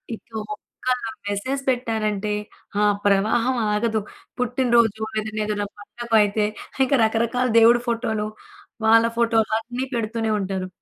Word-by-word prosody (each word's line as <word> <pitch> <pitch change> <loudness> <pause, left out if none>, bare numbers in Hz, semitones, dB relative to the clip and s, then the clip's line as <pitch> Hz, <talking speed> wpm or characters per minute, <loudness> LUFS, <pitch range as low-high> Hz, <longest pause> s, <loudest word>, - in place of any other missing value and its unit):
ఇక - - -21 0.2
ఒక్క - - -5 0.7
మెసేజ్ 260 +7 -2
పెట్టారంటే 215 -4 -1 0.5
ఆ - - +4 0.2
ప్రవాహం 220 +6 +2 0.2
ఆగదు. 220 0 +1 0.4
పుట్టినరోజు 235 -3 +2 0.2
ఏదన్నా 215 0 -4
ఏదన్నా 205 -1 -1
పండగయితే 215 -1 +1 0.4
ఇంకా 275 +2 +2
రకరకాల 235 +3 +1
దేవుడి 235 +1 +6
ఫోటోలు, 225 -2 -1 0.6
వాళ్ళ 225 +1 +6
ఫోటోలన్నీ 230 +2 +1
పెడుతూనే 225 -1 -1
ఉంటారు. 190 -1 -3
225 Hz, 105 wpm, -23 LUFS, 210-235 Hz, 0.7 s, దేవుడి